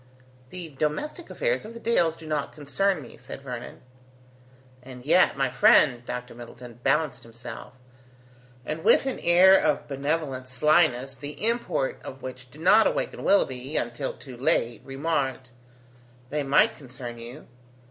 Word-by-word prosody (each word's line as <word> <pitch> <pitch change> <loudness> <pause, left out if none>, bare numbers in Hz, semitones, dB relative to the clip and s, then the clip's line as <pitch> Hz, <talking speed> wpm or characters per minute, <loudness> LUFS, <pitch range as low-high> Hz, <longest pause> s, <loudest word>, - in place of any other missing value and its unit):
"The 175 0 -7
domestic 155 - -3
affairs - - -1
of 225 +2 -10
the - - -7
Dales 175 -9 +2
do 165 - -13
not 150 -2 -2
concern 155 +4 -1
me," - - -13
said 135 - -10
Vernon. 125 -3 -8 1.0
"And 125 0 -12
yet, 160 -1 +4
my 135 -2 +1
friend," 125 0 +5
Dr. 125 0 -6
Middleton 120 0 -11
balanced 140 -2 +1
himself, 115 +1 -10 0.9
and 155 +4 -4
with - - +5
an 265 - -2
air 180 +2 +6
of 155 -5 +1
benevolent 140 -2 -2
slyness 135 -1 +2
the 145 +7 -6
import 230 - -1
of 130 0 -9
which 125 -1 -8
did 150 +5 -14
not 210 +6 +6
awaken - - -2
Willoughby, 135 -6 +1
until 120 +3 -2
too 130 -3 -12
late, 120 -3 +1
remarked: 135 -2 -2 0.8
"They 150 0 0
might 145 +11 +3
concern 125 -4 -9
you. 120 +6 -10
140 Hz, 145 wpm, -26 LUFS, 125-160 Hz, 1.0 s, air